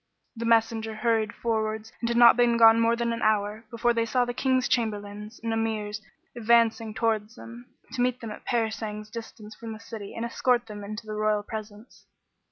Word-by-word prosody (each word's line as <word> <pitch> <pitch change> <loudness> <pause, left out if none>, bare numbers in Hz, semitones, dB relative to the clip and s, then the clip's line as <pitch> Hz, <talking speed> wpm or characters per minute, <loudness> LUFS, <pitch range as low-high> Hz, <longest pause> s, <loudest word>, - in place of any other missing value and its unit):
The 230 0 -4
messenger 225 -1 +2
hurried 220 -1 +1
forwards 220 -1 -2
and 235 - -2
had 235 - 0
not 235 -1 +8
been 240 -1 +3
gone 225 0 +7
more 230 0 +3
than 235 0 -1
an 230 - -5
hour, 215 +1 0
before 235 +1 +1
they 230 0 0
saw 250 +1 +2
the 245 - -4
King's 255 0 +1
Chamberlains 210 -1 -3
and 225 -1 -1
Emirs 215 -2 -2 0.3
advancing 230 -1 +2
towards 225 0 -1
them, 235 +1 -11 0.2
to 250 - -2
meet 250 0 +1
them 230 -4 -7
at - - -9
a - - -10
parasang's 220 -2 -2
distance 220 -2 -9
from 225 0 -8
the 215 - -10
city 225 -3 -9
and 230 - -3
escort 240 +1 +1
them 210 -2 -8
into 215 +2 -7
the 215 - -6
royal 215 -1 +1
presence. 215 +1 -9
225 Hz, 195 wpm, -26 LUFS, 215-235 Hz, 0.3 s, not